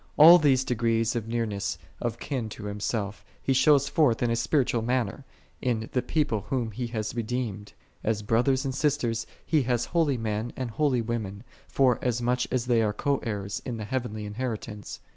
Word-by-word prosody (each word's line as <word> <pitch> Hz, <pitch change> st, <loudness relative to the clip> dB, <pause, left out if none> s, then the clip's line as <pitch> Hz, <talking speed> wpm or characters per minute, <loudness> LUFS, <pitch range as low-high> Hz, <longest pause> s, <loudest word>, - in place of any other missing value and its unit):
All 165 Hz, +4 st, +10 dB
these 135 Hz, -4 st, +4 dB
degrees 115 Hz, -2 st, +1 dB
of 115 Hz, -2 st, -2 dB
nearness 110 Hz, -4 st, -2 dB, 0.2 s
of -, -, -2 dB
kin 125 Hz, -6 st, -3 dB
to 105 Hz, -, -9 dB
Himself, 105 Hz, 0 st, -3 dB, 0.2 s
He 135 Hz, -, 0 dB
shows 140 Hz, +1 st, +5 dB
forth 135 Hz, -7 st, +2 dB
in 120 Hz, -, +2 dB
a -, -, +2 dB
spiritual 120 Hz, -1 st, +1 dB
manner, 125 Hz, +1 st, -1 dB, 0.4 s
in 115 Hz, -3 st, -1 dB
the 125 Hz, -, +2 dB
People 130 Hz, -4 st, 0 dB
whom 120 Hz, -4 st, -1 dB
He 120 Hz, +3 st, -4 dB
hath 110 Hz, -2 st, -3 dB
redeemed: 115 Hz, -3 st, -3 dB, 0.3 s
as 105 Hz, -1 st, 0 dB
brothers 130 Hz, +5 st, +2 dB
and 135 Hz, -, -1 dB
sisters 130 Hz, -5 st, 0 dB, 0.2 s
He 155 Hz, -3 st, +3 dB
hath 120 Hz, -2 st, 0 dB
holy 160 Hz, -6 st, +1 dB
men 110 Hz, +1 st, -2 dB
and 125 Hz, -3 st, -4 dB
holy 130 Hz, -2 st, +1 dB
women, 110 Hz, -3 st, -4 dB, 0.2 s
forasmuch 125 Hz, -1 st, +1 dB
as 125 Hz, -2 st, 0 dB
they 120 Hz, -2 st, +3 dB
all 110 Hz, -, +2 dB
are -, -, -3 dB
co 140 Hz, +5 st, 0 dB
heirs 100 Hz, -3 st, -4 dB
in 120 Hz, -3 st, -4 dB
the 110 Hz, -, -5 dB
heavenly 115 Hz, -3 st, -3 dB
inheritance. 105 Hz, -1 st, -5 dB
120 Hz, 180 wpm, -27 LUFS, 110-130 Hz, 0.4 s, All